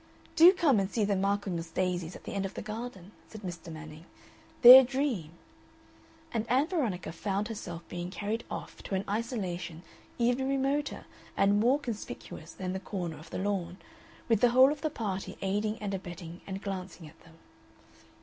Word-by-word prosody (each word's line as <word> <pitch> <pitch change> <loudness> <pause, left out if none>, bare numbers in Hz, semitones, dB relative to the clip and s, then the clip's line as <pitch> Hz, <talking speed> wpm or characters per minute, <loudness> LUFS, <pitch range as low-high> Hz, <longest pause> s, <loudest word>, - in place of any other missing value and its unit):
"Do 340 +3 +9
come 315 - +3
and 195 -1 0
see 215 +1 0
the 200 0 +1
Michaelmas 195 -4 -1
daisies 180 -1 -2
at - - -11
the - - -6
end 200 -1 -1
of 195 0 -5
the - - -5
garden," 215 -3 -7 0.2
said 215 - -10
Mr. 175 -2 -7
Manning, 155 +1 -10 0.6
"they're 255 +2 +13
a - - +1
dream." 250 - -2 1.0
And 230 0 -2
Ann 260 +4 +4
Veronica 270 - -2
found 200 +4 -2
herself 175 -6 -7
being 175 0 -5
carried 210 +4 -3
off - - -7
to 195 - -4
an 190 - -1
isolation 185 -7 -3 0.3
even 245 +3 +1
remoter 275 +2 -1 0.3
and 200 +1 +4
more 245 +6 +4
conspicuous 210 - -7
than 185 -1 -4
the 190 - -3
corner 175 -5 -5
of 160 +1 -13
the - - -5
lawn, 185 -3 -2 0.5
with 225 -3 +2
the 245 - +6
whole 260 +3 +6
of 295 -1 -5
the 310 - 0
party 200 -8 -4
aiding 210 +3 0
and 205 -2 -3
abetting 175 -2 -7
and 195 0 -5
glancing 185 -4 -6
at 160 +2 -17
them. 165 -1 -18
200 Hz, 180 wpm, -30 LUFS, 180-235 Hz, 1.0 s, they're